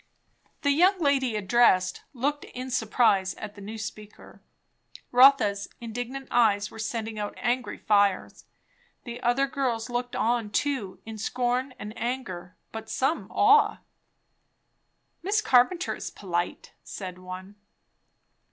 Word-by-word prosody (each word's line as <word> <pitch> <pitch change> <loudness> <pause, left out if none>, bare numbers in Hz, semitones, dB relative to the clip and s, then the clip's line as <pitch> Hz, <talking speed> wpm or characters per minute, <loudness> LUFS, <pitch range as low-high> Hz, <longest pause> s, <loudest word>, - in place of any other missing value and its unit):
The 285 - +3
young 365 +6 +4
lady 275 -6 +1
addressed 195 -3 +3
looked 285 +3 -2
in 255 +1 -7
surprise 220 -5 +2
at 210 -1 -8
the 205 - -13
new 215 +3 -7
speaker. 215 -1 -9 0.7
Rotha's 245 -6 +5
indignant 245 +3 -6
eyes 210 -4 +3
were - - -11
sending 220 -1 -4
out 205 0 -4
angry 245 +1 -1
fires. 200 -3 +1 0.6
The 240 0 -7
other 245 +3 +2
girls 250 -4 -2
looked 245 0 -3
on 230 -2 0
too, 220 -3 -1
in 220 -1 -8
scorn 250 +3 -1
and 210 +2 -8
anger, 225 -7 -5
but 220 0 -7
some 265 +8 -1
awe. 425 +1 +4 1.4
"Miss 405 +4 +1
Carpenter 340 +2 +3
is - - -6
polite!" 175 -3 -4
said 185 -2 -7
one. 185 +2 -9
235 Hz, 125 wpm, -27 LUFS, 205-260 Hz, 1.4 s, Rotha's